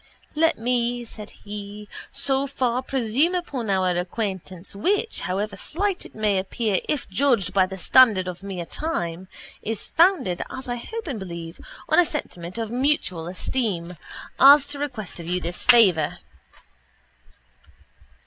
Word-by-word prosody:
—Let 325 +2 +2
me, 240 0 0
said 215 -2 -9
he, 205 0 -9 0.2
so 270 0 +1
far 255 -2 0
presume 265 +6 +1
upon 275 - -3
our 185 -2 +2
acquaintance 185 0 -4
which, 405 - 0
however 200 +3 -2
slight 385 +3 -2
it - - -23
may 210 -3 +1
appear 200 +1 -1
if 300 -4 -1
judged 205 -4 +1
by 190 -2 +4
the 190 0 -7
standard 205 -1 +5
of 180 0 -6
mere 190 -3 -5
time, 180 - -4 0.3
is 220 -1 -3
founded, 335 - +2
as 260 0 -7
I 245 0 -2
hope 450 - -6
and 265 -9 -4
believe, 170 -3 -7 0.3
on - - +4
a 355 - +6
sentiment 180 - -5
of 225 -1 -3
mutual 245 - 0
esteem 180 -2 -2 0.4
as 280 +1 +8
to 285 0 -5
request 245 - -5
of 165 - -8
you 180 +1 0
this 175 0 -4
favour. 220 -10 +5
220 Hz, 145 wpm, -24 LUFS, 185-270 Hz, 0.4 s, as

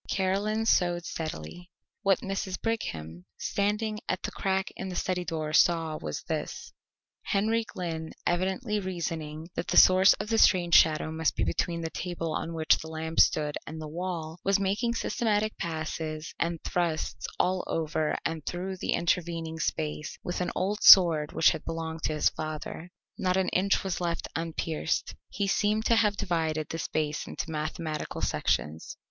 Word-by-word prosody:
Caroline 205 +3 0
sewed 175 -4 +2
steadily. 160 - -6 0.3
What 195 -3 +3
Mrs. 195 -1 -3
Brigham, 85 - -4
standing 210 +1 -1
at 185 - -1
the - - -3
crack 190 0 -1
in 190 - -5
the 180 - -5
study 180 0 -1
door, 155 -3 -3
saw 165 -1 +3
was 75 -1 -4
this: - - -4 0.5
Henry 220 +3 +1
Glynn, 165 -5 -5
evidently 190 +5 0
reasoning 165 -3 -4
that - - -4
the - - +1
source 185 +1 +8
of - - -5
the 225 -1 +2
strange 175 -5 +4
shadow 155 -1 +5
must 160 0 0
be - - 0
between 170 -1 -1
the 165 -1 -4
table 165 -2 -3
on 165 +1 -3
which 160 -1 +3
the 160 - -8
lamp 160 0 -4
stood 150 -1 +3
and 160 0 -6
the 155 - -6
wall, 165 0 -4
was 195 +1 +3
making 205 +5 0
systematic 215 -2 0
passes 155 -1 -4
and 170 -1 -1
thrusts 170 -3 -1
all 185 0 +1
over 155 -1 -1
and 160 -1 -2
through 185 +2 -3
the - - -1
intervening 165 -1 -1
space 75 - -3
with 175 - -3
an 180 - 0
old 205 +3 -1
sword 165 -5 +8
which 160 - +5
had - - -5
belonged 165 -1 -4
to 155 - 0
his 150 - +3
father. 155 +2 -6 0.3
Not 185 0 +1
an 190 -1 +1
inch 195 +2 +2
was 190 -2 -3
left 170 -1 -2
unpierced. 165 -1 -2 0.2
He 200 - -2
seemed 210 +2 +1
to 230 - +4
have 210 -3 +3
divided 160 -4 -1
the 165 - -4
space 150 -2 -2
into 160 - -5
mathematical 155 0 -4
sections. 80 +2 -1
170 Hz, 165 wpm, -28 LUFS, 160-190 Hz, 0.5 s, source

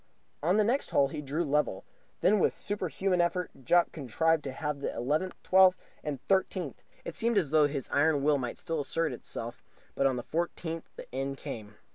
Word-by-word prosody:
On 175 +7 +3
the 215 - +5
next 245 +6 +1
hole 140 -1 +3
he 150 +1 -5
drew 150 +4 -1
level. 150 - 0 0.4
Then 210 +2 +4
with - - +2
a - - -19
superhuman 190 -2 0
effort 180 +1 0
Jopp 175 +7 +4
contrived 160 +3 +1
to 135 - -3
halve 150 +1 -3
the - - -1
eleventh, 155 +9 0
twelfth, 185 0 +6 0.3
and 145 -3 -3
thirteenth. 190 -5 0 0.2
It - - -4
seemed 230 -1 +1
as 160 -8 +2
though 155 -2 +5
his 140 -3 -3
iron 145 0 +3
will 145 -1 +3
might 120 -2 -4
still 165 -1 -3
assert 155 +1 -1
itself, 120 0 -6 0.3
but 135 - +2
on 130 - +1
the 120 - -4
fourteenth 165 0 -3
the - - -8
end 135 +1 -2
came. 105 -4 -7
155 Hz, 195 wpm, -30 LUFS, 140-180 Hz, 0.4 s, twelfth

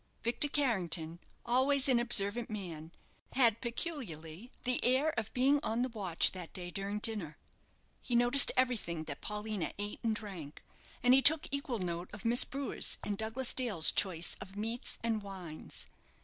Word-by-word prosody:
Victor 235 +5 +3
Carrington, 175 - -2 0.3
always 265 +3 +3
an 255 -3 +3
observant 230 -1 +3
man, 170 -7 -7 0.4
had 235 -4 +2
peculiarly 235 - -6
the 250 0 -1
air 265 +5 +2
of 220 -6 -4
being 275 +3 +3
on 230 -2 -1
the 255 - -2
watch 195 -8 +2
that 180 -3 -9
day 180 -1 -6
during 200 +3 -4
dinner. 210 -8 0 0.6
He 245 - -3
noticed 245 +3 +6
everything 225 -11 0
that 145 -3 -8
Paulina 210 -3 -4
ate 205 0 -5
and 225 -2 -1
drank, 185 -9 -9 0.4
and 250 0 +5
he 265 - +6
took 305 +2 +6
equal 280 -3 -3
note 175 -2 -4
of 210 0 -10
Miss 235 +2 +6
Brewer's 275 +1 -2
and 205 - -3
Douglas 225 +5 -2
Dale's 220 -11 +3
choice 180 -4 +1
of 195 +1 -10
meats 225 +4 -4
and 225 -2 -1
wines. 185 -6 -8
220 Hz, 160 wpm, -32 LUFS, 185-250 Hz, 0.6 s, noticed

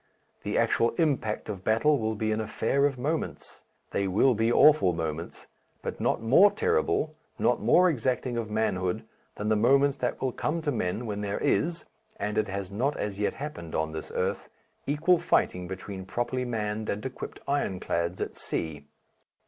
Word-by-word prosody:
The - - -2
actual 115 0 +2
impact 130 -9 0
of 95 -3 -5
battle 140 +8 +3
will 110 0 -1
be 110 +1 -1
an 110 +1 0
affair 140 +6 +1
of 135 -2 -4
moments. 150 +6 -3 0.3
They 100 - 0
will 105 +8 +4
be 115 +1 +1
awful 150 -10 +6
moments, 80 0 -4 0.4
but - - -5
not - - 0
more 140 - +7
terrible, 450 - 0 0.2
not - - +2
more 185 - +5
exacting 125 -4 0
of 115 -2 -3
manhood 95 -4 0 0.3
than 105 - -4
the 110 - +4
moments 135 +5 +4
that 125 -2 -2
will 130 - 0
come 155 +6 -2
to 150 - 0
men 110 -1 -2
when 105 -2 -3
there 100 0 -2
is 165 +4 0 0.3
and 105 +1 -1
it 110 - 0
has 100 -1 -4
not 130 +8 0
as 105 -1 -3
yet 105 - 0
happened 135 - -6
on 80 0 -1
this 80 - -6
earth - - -1 0.4
equal 160 +5 +3
fighting 90 - +1
between 95 +1 -7
properly 125 +3 -2
manned 110 -2 -2
and 105 +1 -3
equipped 130 - -6
ironclads 90 -9 -1
at - - -3
sea. 75 -3 -4
110 Hz, 175 wpm, -28 LUFS, 100-140 Hz, 0.4 s, more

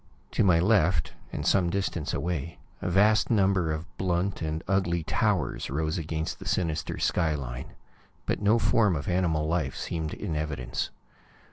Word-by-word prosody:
To - - +2
my 90 -4 +5
left, 90 -4 +3 0.2
and - - -4
some 90 -3 +3
distance 90 -4 -2
away, 85 +1 -3 0.2
a - - -1
vast 105 +4 +4
number 95 -7 +3
of 80 +2 -3
blunt 90 +1 0
and 80 0 -2
ugly 95 -4 +1
towers - - 0
rose 80 +4 -1
against 80 0 -3
the - - -8
sinister 80 -4 -1
skyline, 70 -7 -1 0.5
but - - -1
no 105 +3 +4
form 115 -4 +3
of 70 - -4
animal 85 -4 +1
life 80 -6 0
seemed 80 -2 -3
in 80 - -4
evidence. 75 -5 -2
85 Hz, 150 wpm, -28 LUFS, 75-95 Hz, 0.5 s, my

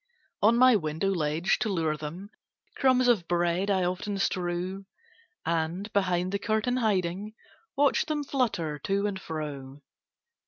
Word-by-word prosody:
On 225 +3 +5
my 255 -1 +7
window 160 +2 -1
ledge, 160 0 0
to 220 - 0
lure 165 -5 0
them, 165 +7 -7 0.4
Crumbs 255 -1 +3
of 210 -9 +3
bread 175 +3 +1
I 190 -2 +2
often 185 +3 -2
strew, 185 +1 -2 0.6
And, 170 +5 -2
behind 180 -2 +1
the 200 - -1
curtain 220 +4 0
hiding, 205 -2 -1 0.4
Watch 285 0 +2
them 300 -2 -1
flutter 195 - -1
to 195 +6 0
and 195 -2 -3
fro. 145 -4 -6
190 Hz, 135 wpm, -28 LUFS, 170-215 Hz, 0.6 s, my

